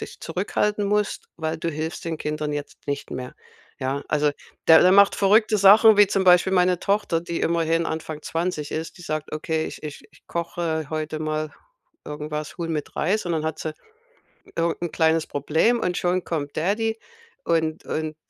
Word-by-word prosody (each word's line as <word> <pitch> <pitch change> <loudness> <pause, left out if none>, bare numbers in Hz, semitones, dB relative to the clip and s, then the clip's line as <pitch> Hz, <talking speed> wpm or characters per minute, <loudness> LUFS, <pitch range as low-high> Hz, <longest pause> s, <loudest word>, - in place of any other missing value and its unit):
dich - - -13
zurückhalten 210 0 -1
musst, 210 0 -1
weil 160 -1 -3
du 170 - -2
hilfst 160 +1 -5
den 165 -1 -2
Kindern 150 0 -3
jetzt 145 0 -6
nicht 140 0 -4
mehr.“ 125 0 -6 0.5
Ja, 135 +2 -2
also 150 -1 +2 0.4
der 160 -1 +9
der 185 +1 +6
macht 200 0 +6
verrückte 215 +2 +4
Sachen 210 +2 +7
wie 205 - +8
zum 195 0 0
Beispiel 180 +1 +5
meine 180 -1 +3
Tochter, 200 -5 0
die 170 0 -4
immerhin 165 0 +1
Anfang 160 -1 -5
20 165 -3 -3
ist, 160 +1 -4
die - - -11
sagt: 155 -2 -4
„Okay, 160 +1 -2
ich - - -9
ich 150 -1 -7
ich 150 - -24
koche 170 -2 -3
heute 155 0 -3
mal 155 0 -2 0.5
irgendwas 150 0 -5
Huhn 165 -1 -3
mit 150 -2 -5
Reis.“ 185 +4 0
Und 175 - -1
dann 160 -1 -1
hat 160 0 -3
sie 155 -1 -4 0.8
irgend 165 0 0
'n 170 - -3
kleines 160 -1 +2
Problem 160 - +1
und 180 -4 -1
schon 180 0 0
kommt 145 -4 -3
Daddy 220 +7 0 0.5
und 160 -1 0
und 155 0 -3
165 Hz, 180 wpm, -24 LUFS, 155-180 Hz, 0.8 s, der